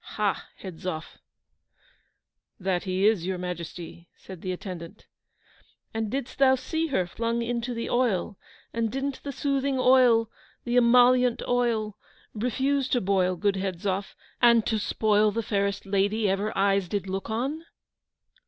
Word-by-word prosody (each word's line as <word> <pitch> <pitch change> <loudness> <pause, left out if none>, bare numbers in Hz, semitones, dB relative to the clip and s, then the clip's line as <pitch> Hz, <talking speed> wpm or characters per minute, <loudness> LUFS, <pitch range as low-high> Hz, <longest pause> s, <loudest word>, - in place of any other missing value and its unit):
Ha, 210 -2 0
Hedzoff!' 175 -3 -7 1.4
'That 185 -1 -1
he 185 +1 0
is, 215 -5 +3
your 190 -1 -1
Majesty,' 175 -1 -7
said 185 -3 -11
the 185 - -3
attendant. 180 -2 -8 0.9
'And 220 -1 -2
didst 265 +2 -4
thou 265 -1 +6
see 320 +5 -2
her 190 - 0
flung 230 +6 -2
into 240 +1 -2
the 230 - -3
oil? 235 -6 0 0.4
and 230 -1 -1
didn't 270 +1 -3
the 285 - -5
soothing 275 0 -1
oil 250 -3 +5 0.3
the 240 0 -2
emollient 245 0 +5
oil, 230 -4 0 0.3
refuse 260 +4 0
to 250 - +2
boil, 185 -3 +1
good 200 +2 0
Hedzoff 190 +1 -3 0.3
and 235 -2 +5
to 220 -2 0
spoil 210 0 +2
the 225 +2 -2
fairest 200 -1 -1
lady 200 +2 +1
ever 200 +3 0
eyes 195 -1 +2
did 195 +1 -3
look 190 +3 -4
on? 270 +9 -2
215 Hz, 140 wpm, -26 LUFS, 190-245 Hz, 1.4 s, thou